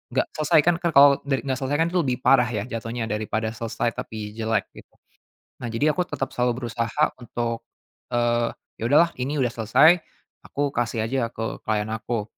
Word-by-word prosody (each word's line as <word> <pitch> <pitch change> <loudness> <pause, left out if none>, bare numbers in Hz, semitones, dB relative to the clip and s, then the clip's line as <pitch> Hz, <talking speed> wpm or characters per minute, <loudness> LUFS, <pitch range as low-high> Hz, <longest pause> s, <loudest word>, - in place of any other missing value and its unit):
nggak 130 - +2
selesai 155 +1 +4
kan, 175 0 +4
Kak, 170 -2 +1
kalau 140 0 +9 0.2
dari 135 -1 0
nggak 130 -2 -1
selesai 135 +2 -1
kan 165 - +3
itu 180 - +3
lebih 130 -5 -1
parah 125 -2 +5
ya, 110 -4 -2
jatuhnya, 115 -1 -4
daripada 110 +1 -2
selesai 115 +1 -2
tapi 105 -1 -6
jelek, 110 -3 0
gitu. - - -15 0.7
Nah, 120 - -3
jadi 145 +7 +2
aku 180 - +1
tetap 135 -2 -3
selalu 125 0 0
berusaha 115 +5 0 0.2
untuk, 115 -1 -3 0.5
eee, 120 -1 +1 0.3
ya - - -3
udahlah, 165 +4 +5
ini 145 +3 -2
udah 125 -3 +1
selesai, 135 +10 +5 0.5
aku 145 0 -1
kasih 115 -2 -1
aja 120 0 -1
ke 115 0 -5
client 105 0 0
aku. 115 -1 -2
120 Hz, 185 wpm, -24 LUFS, 115-140 Hz, 0.7 s, kalau